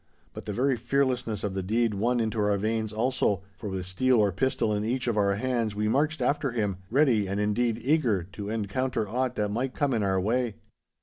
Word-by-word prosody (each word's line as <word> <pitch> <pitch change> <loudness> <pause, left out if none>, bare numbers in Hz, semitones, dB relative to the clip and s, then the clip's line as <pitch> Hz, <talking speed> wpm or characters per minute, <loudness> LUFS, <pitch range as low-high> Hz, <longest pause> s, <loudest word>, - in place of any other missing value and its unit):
But - - -8
the - - -1
very 130 +4 +1
fearlessness 125 -3 0
of 100 - -2
the 95 - -2
deed 110 +4 +1
won 120 +5 +1
into 110 -1 -1
our 105 -1 +2
veins 110 +1 -1
also, 110 -4 0
for 105 +2 -6
with 95 -1 -4
steel 120 +7 +2
or 105 -2 +3
pistol 105 +2 0
in 105 0 -1
each 125 +3 -1
of 115 - +1
our 100 -1 +2
hands 115 -2 -1
we 105 +1 0
marched 145 +4 +1
after 140 +2 +1
him—ready, 105 +2 +1
and, 100 +2 -2
indeed, 115 +2 +1
eager, 125 - +1
to 100 0 -6
encounter 110 +2 -1
aught 125 +3 -1
that 105 -1 0
might 125 +5 -2
come 145 -3 +1
in 115 - +1
our 95 -1 +1
way. 115 +3 0
110 Hz, 205 wpm, -27 LUFS, 105-125 Hz, -, or